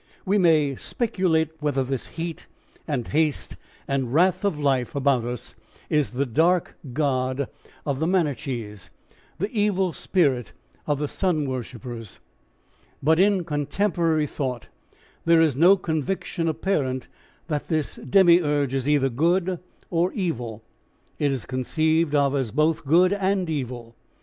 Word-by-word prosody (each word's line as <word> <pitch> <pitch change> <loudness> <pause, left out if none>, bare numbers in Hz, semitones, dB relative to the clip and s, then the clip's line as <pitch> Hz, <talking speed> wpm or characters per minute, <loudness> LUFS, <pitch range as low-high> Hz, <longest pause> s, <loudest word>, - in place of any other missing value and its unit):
We 200 +2 +2
may 155 -6 +3
speculate 180 -9 0
whether 145 -3 +1
this 130 -1 -3
heat 165 0 -5 0.4
and 135 -7 -2
haste 155 -1 0 0.3
and 135 -3 -1
wrath 180 +6 +3
of 195 -7 0
life 135 -4 0
about 135 -4 +2
us 120 0 -5 0.4
is 150 -3 +2
the 135 +3 -1
Dark 165 +8 +2 0.2
God 130 -1 0 0.4
of 140 -2 -1
the 160 - 0
Manichees, 125 - -2 0.5
the 200 +4 -2
evil 200 -5 +1
spirit 140 - 0 0.3
of 145 -1 +1
the 145 +1 -2
sun 160 -4 0
worshippers. 120 -3 -6 0.8
But 160 +3 +4
in 195 -1 +4
contemporary 160 +1 0
thought 130 -4 -4 0.6
there 165 0 +5
is 160 -5 +3
no 175 +7 +6
conviction 165 +1 -2
apparent 150 -6 -1 0.4
that 150 -3 -3
this 155 -3 -1
Demiurge 150 -3 +3
is 135 +1 -1
either 140 -2 +3
good 170 +7 +1 0.3
or 175 +1 +2
evil; 120 - -3 0.6
it 145 -2 +2
is 130 -4 -3
conceived 155 +4 +1
of 140 -1 +3
as 130 -4 0
both 155 +4 +1
good 180 +6 +5
and 195 -2 0
evil. 120 -5 -5
150 Hz, 135 wpm, -24 LUFS, 130-170 Hz, 0.8 s, no